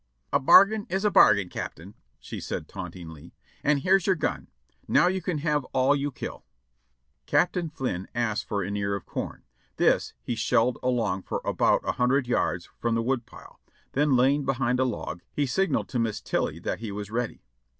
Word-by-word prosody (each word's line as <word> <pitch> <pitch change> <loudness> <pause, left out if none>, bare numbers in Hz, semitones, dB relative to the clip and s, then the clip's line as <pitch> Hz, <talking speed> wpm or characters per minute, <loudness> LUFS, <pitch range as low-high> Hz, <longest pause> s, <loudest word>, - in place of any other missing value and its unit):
" 65 - -31
'A 140 - +4
bargain 205 - +6
is 195 +2 -1
a 210 - +3
bargain. 100 - +6
Captain,' 90 +2 -7 0.3
she - - -7
said - - -5
tauntingly, 80 -4 -9 0.3
'and 145 -1 +2
here's 190 +1 +3
your 190 - +4
gun; 160 - -2 0.4
now - - +4
you 190 +1 +1
can 175 -2 -2
have 150 -1 0
all 135 +2 +3
you 145 0 -2
kill.' - - -7 0.8
"Captain 170 +3 +1
Flynn 125 -11 -4
asked 120 -1 -1
for 100 -2 -1
an 100 +2 -3
ear 100 0 -1
of 100 - -7
corn; - - -5 0.3
this - - +2
he - - -2
shelled 115 +1 +1
along 115 -7 0
for - - -4
about - - +2
a - - +3
hundred 130 +2 +3
yards 90 -7 0
from 115 -1 0
the 115 - 0
woodpile, 120 -1 -4 0.3
then 145 0 +2
lying 135 +4 +3
behind 125 -2 0
a 130 - +3
log, 105 -7 -4
he 145 - 0
signified 190 +9 0
to 125 - -2
Miss 115 -2 -1
Tilly - - -2
that - - -4
he 110 -2 -5
was 100 +1 -6
ready. 120 0 -3
125 Hz, 185 wpm, -26 LUFS, 105-145 Hz, 0.8 s, bargain